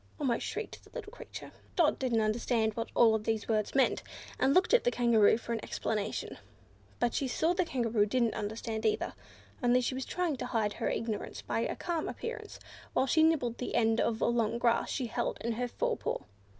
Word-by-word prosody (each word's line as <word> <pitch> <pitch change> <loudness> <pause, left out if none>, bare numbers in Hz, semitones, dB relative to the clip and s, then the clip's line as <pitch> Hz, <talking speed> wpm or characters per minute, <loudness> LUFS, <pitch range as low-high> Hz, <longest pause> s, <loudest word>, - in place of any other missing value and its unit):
almost 250 -5 0
shrieked - - -5
the - - -18
little 445 -4 -6
creature. - - -9 0.2
Dot 330 -4 +3
didn't 240 -4 +1
understand 220 0 +1
what 230 +2 -4
all 225 -2 +5
these 220 0 -2
words 215 0 0
meant, 270 - +3 0.4
and 270 - +4
looked 370 - +4
at - - +6
the - - +3
Kangaroo 235 -3 +4
for 235 0 -4
an 225 - -3
explanation; 215 -1 -3 0.6
but 240 - +1
she 275 - 0
saw 315 +6 +1
that 355 - +1
the 365 - +3
Kangaroo 230 -7 +1
didn't 235 +1 +1
understand 220 +1 -4
either, 220 - 0 0.5
only 245 0 +4
she 250 +1 -1
was 260 +1 -3
trying 345 -5 -1
to - - -4
hide 220 -4 0
her - - -2
ignorance 225 -2 -3
by - - -1
a - - -1
calm 335 -3 -2
appearance, 465 - -6 0.3
while 260 - +3
she 315 +4 +3
nibbled 300 -8 +2
the 250 - -3
end 225 0 +3
of 225 -1 0
a - - +3
long 235 -1 +1
grass 235 -1 +2
she 260 - -1
held 230 - -2
in 235 - -1
her 245 +2 -1
fore - - -1
paw. - - -2
235 Hz, 205 wpm, -31 LUFS, 220-265 Hz, 0.6 s, at